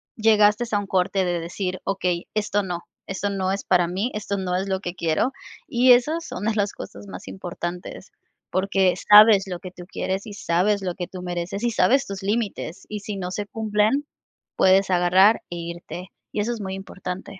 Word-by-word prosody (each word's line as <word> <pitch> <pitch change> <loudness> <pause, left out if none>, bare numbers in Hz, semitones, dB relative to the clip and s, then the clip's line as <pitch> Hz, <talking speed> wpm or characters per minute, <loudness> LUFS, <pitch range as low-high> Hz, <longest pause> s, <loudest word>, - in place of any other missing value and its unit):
llegaste 215 0 +4
a 205 - +2
un 205 - -6
corte 190 0 +1
de 175 -1 0
decir: 180 +2 -4
"Okey, 180 -2 -1
esto 205 -1 0
no, 175 -2 -4 0.3
esto 195 +1 -2
no 190 -1 -1
es 195 - -2
para 175 -2 +3
mí, 195 +8 -2
esto 200 -1 -2
no 180 -1 -1
es 190 +2 -1
lo 190 0 0
que 180 -2 -5
quiero", 170 +8 +1 0.4
y 250 +1 +4
esas 310 +7 +1
son 200 - -5
de 220 0 +1
las 205 -1 0
cosas 100 +1 -9
más 95 -1 -9
importantes, 175 - -6 0.4
porque 190 -1 +2 0.2
sabes 210 -1 +9
lo 180 -2 -5
que 185 - -9
tú 180 -1 -11
quieres 190 0 -3
y 210 - -7
sabes 200 +2 +1
lo 180 -2 -2
que 175 - -4
tú 185 -1 -8
mereces 175 +3 -4
y 240 - +2
sabes 240 +7 +3
tus 195 -1 -7
límites 205 -5 -2
y 210 0 -4
si 205 0 -5
no 180 -2 -4
se 205 +2 -3
cumplen 220 +6 +1 0.5
puedes 190 +1 +4
agarrar 185 +4 +5
e 175 - -5
irte, 170 +2 -7 0.2
y - - -3
eso 235 +3 -1
es 225 - -6
muy 190 -1 -4
importante. 190 0 -7
195 Hz, 200 wpm, -23 LUFS, 180-210 Hz, 0.5 s, sabes